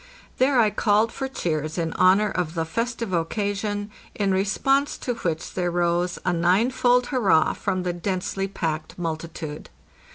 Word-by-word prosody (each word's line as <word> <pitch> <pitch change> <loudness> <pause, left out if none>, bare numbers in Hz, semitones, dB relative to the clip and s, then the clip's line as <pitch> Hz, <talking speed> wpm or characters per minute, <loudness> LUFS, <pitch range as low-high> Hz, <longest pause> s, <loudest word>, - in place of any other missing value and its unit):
There 260 0 +4
I 215 -3 +4
called 210 +2 +2
for 270 - -4
cheers 155 - -3
in 165 -1 -1
honor 190 +3 +4
of 175 -2 -2
the 165 -1 0
festive 230 +2 -3
occasion, 205 +4 -2 0.2
in 200 -2 +1
response 270 +9 +1
to 245 - -2
which 170 -8 -3
there 180 -1 0
rose 175 0 0
a 180 - +2
ninefold 245 +8 +3
hurrah 200 - +3
from 185 -1 -2
the 180 -1 -1
densely 190 +2 -2
packed 160 -5 -4
multitude. 160 -2 -5
190 Hz, 150 wpm, -24 LUFS, 170-220 Hz, 0.2 s, There